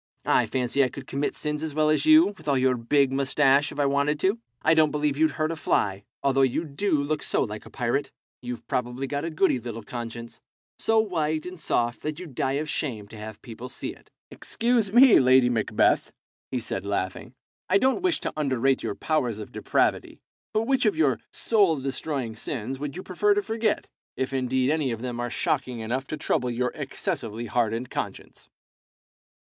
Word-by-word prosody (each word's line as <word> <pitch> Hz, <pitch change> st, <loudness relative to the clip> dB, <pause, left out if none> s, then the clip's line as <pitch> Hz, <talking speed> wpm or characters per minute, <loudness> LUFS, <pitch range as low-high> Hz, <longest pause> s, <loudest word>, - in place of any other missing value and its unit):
I -, -, +3 dB
fancy 130 Hz, +2 st, +1 dB
I 130 Hz, -, +1 dB
could 135 Hz, +1 st, -9 dB
commit 140 Hz, +2 st, -2 dB
sins 150 Hz, 0 st, -2 dB
as 155 Hz, -2 st, -4 dB
well 155 Hz, 0 st, +3 dB
as 155 Hz, -, +1 dB
you, 310 Hz, -8 st, +7 dB
with 160 Hz, -4 st, -16 dB
all 140 Hz, -2 st, +3 dB
your 130 Hz, 0 st, +3 dB
big 130 Hz, +3 st, +2 dB
moustache, 140 Hz, +1 st, +3 dB
if 145 Hz, -, -8 dB
I 145 Hz, -, +3 dB
wanted 140 Hz, +2 st, +1 dB
to. 195 Hz, +5 st, +2 dB, 0.2 s
I 160 Hz, -, +5 dB
don't 155 Hz, -1 st, +5 dB
believe 150 Hz, -1 st, 0 dB
you'd 155 Hz, +1 st, +2 dB
hurt 155 Hz, +1 st, 0 dB
a -, -, -3 dB
fly, 100 Hz, -10 st, 0 dB, 0.2 s
although 135 Hz, 0 st, +3 dB
you 135 Hz, +5 st, +1 dB
do 155 Hz, +8 st, -2 dB
look 150 Hz, +1 st, -1 dB
so -, -, +1 dB
like 105 Hz, -3 st, -6 dB
a -, -, -11 dB
pirate. 125 Hz, +3 st, -1 dB, 0.3 s
You've 125 Hz, -1 st, -6 dB
probably 125 Hz, +2 st, -2 dB
got 145 Hz, +3 st, -3 dB
a -, -, -2 dB
goody 160 Hz, -4 st, +2 dB
little 115 Hz, -1 st, -7 dB
conscience, 115 Hz, 0 st, -7 dB, 0.4 s
so 225 Hz, -, +2 dB
white 160 Hz, -7 st, 0 dB
and 180 Hz, -1 st, -8 dB
soft 120 Hz, -5 st, 0 dB
that 155 Hz, 0 st, -4 dB
you'd 170 Hz, -7 st, -9 dB
die 130 Hz, +2 st, 0 dB
of 150 Hz, +2 st, -1 dB
shame 115 Hz, -10 st, -3 dB
to -, -, -11 dB
have 105 Hz, 0 st, -9 dB
people 120 Hz, +2 st, -8 dB
see -, -, -5 dB
it." -, -, -22 dB, 0.2 s
"Excuse 230 Hz, -4 st, 0 dB
me, 245 Hz, +2 st, +8 dB
Lady 130 Hz, -1 st, +5 dB
Macbeth," 110 Hz, -3 st, +2 dB, 0.4 s
he 125 Hz, -, -1 dB
said, 115 Hz, -3 st, -4 dB
laughing; 100 Hz, +4 st, -3 dB, 0.3 s
"I 190 Hz, -, +5 dB
don't 260 Hz, -, +2 dB
wish 365 Hz, -2 st, +1 dB
to -, -, -3 dB
underrate 135 Hz, -3 st, +1 dB
your -, -, -3 dB
powers 125 Hz, -9 st, 0 dB
of 105 Hz, -, -8 dB
depravity, -, -, 0 dB, 0.3 s
but 215 Hz, -, +1 dB
which 260 Hz, -1 st, +2 dB
of 205 Hz, -, +1 dB
your 135 Hz, -8 st, +2 dB
soul 200 Hz, -7 st, +3 dB
destroying 135 Hz, -3 st, -3 dB
sins 130 Hz, +2 st, -5 dB
would 145 Hz, +2 st, -5 dB
you 185 Hz, -, -6 dB
prefer 205 Hz, +3 st, +2 dB
to 205 Hz, -, +1 dB
forget, 220 Hz, 0 st, -1 dB, 0.3 s
if 130 Hz, +1 st, -2 dB
indeed 130 Hz, +1 st, +1 dB
any 155 Hz, -4 st, +1 dB
of 115 Hz, 0 st, -4 dB
them 120 Hz, -1 st, -4 dB
are 120 Hz, 0 st, -2 dB
shocking 130 Hz, -1 st, -1 dB
enough 125 Hz, +5 st, -3 dB
to 155 Hz, -, -4 dB
trouble 125 Hz, -3 st, 0 dB
your 125 Hz, +1 st, -1 dB
excessively 130 Hz, -, -4 dB
hardened 120 Hz, +1 st, -1 dB
conscience? -, -, -6 dB
140 Hz, 195 wpm, -26 LUFS, 120-155 Hz, 0.4 s, me